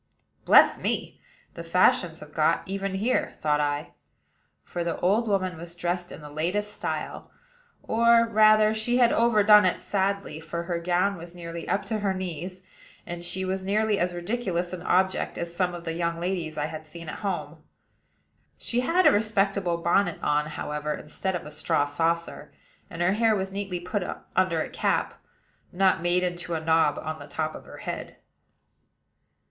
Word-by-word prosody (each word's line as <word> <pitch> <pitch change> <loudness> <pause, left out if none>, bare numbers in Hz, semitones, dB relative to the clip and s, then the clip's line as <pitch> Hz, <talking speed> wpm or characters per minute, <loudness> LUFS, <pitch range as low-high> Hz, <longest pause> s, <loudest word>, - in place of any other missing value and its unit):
"Bless - - +6
me! - - -3 0.3
the - - -7
fashions - - +2
have - - -12
got - - +2
even 195 0 -3
here," 225 +6 0
thought 150 -1 +1
I; 145 0 -2 0.7
for 175 - -4
the 170 -1 -3
old 210 +6 +2
woman 185 -4 0
was 170 +1 -9
dressed 175 0 -2
in - - -9
the 150 - -9
latest 185 +8 -2
style, - - -4 0.5
or, 235 +1 +4
rather, 215 -1 +5
she 220 +3 0
had 240 -2 +5
overdone 210 -3 +6
it 185 - +1
sadly; 200 -5 -1
for 165 +1 -5
her 170 -1 -2
gown 180 +3 +1
was 170 +1 -10
nearly 170 -1 -7
up 200 +1 0
to 215 +2 -2
her 195 -2 0
knees, 185 +1 -5 0.4
and 175 0 -6
she 185 +2 -1
was 190 0 -2
nearly 210 +1 +1
as 175 0 0
ridiculous 180 -2 -2
an 180 - -5
object 190 +1 +1
as 170 0 -4
some 180 -1 0
of 170 - -8
the 165 -1 -3
young 170 0 -2
ladies 170 -3 -3
I 150 - 0
had 155 0 -7
seen 165 +1 -10
at - - -6
home. 200 -2 -3 1.0
She 240 - -1
had 335 +9 +2
a - - +8
respectable 200 -4 +1
bonnet 175 +1 +1
on, 150 0 +1
however, 150 0 -3
instead 190 +5 -4
of 175 - -5
a 150 - -8
straw 145 -1 +1
saucer; 165 +3 -2 0.4
and 170 +1 -3
her 180 +2 +3
hair 225 0 +3
was 190 -1 -2
neatly 195 -2 -3
put 180 +4 -3 0.3
under 185 -4 +2
a - - -7
cap, - - -1 0.5
not 185 -1 +2
made 175 +1 +2
into 175 -1 -2
a - - -1
knob 160 -1 +2
on 155 0 -5
the 145 - -10
top 155 0 -3
of - - -10
her - - -11
head. - - -6
180 Hz, 175 wpm, -26 LUFS, 170-200 Hz, 1.0 s, a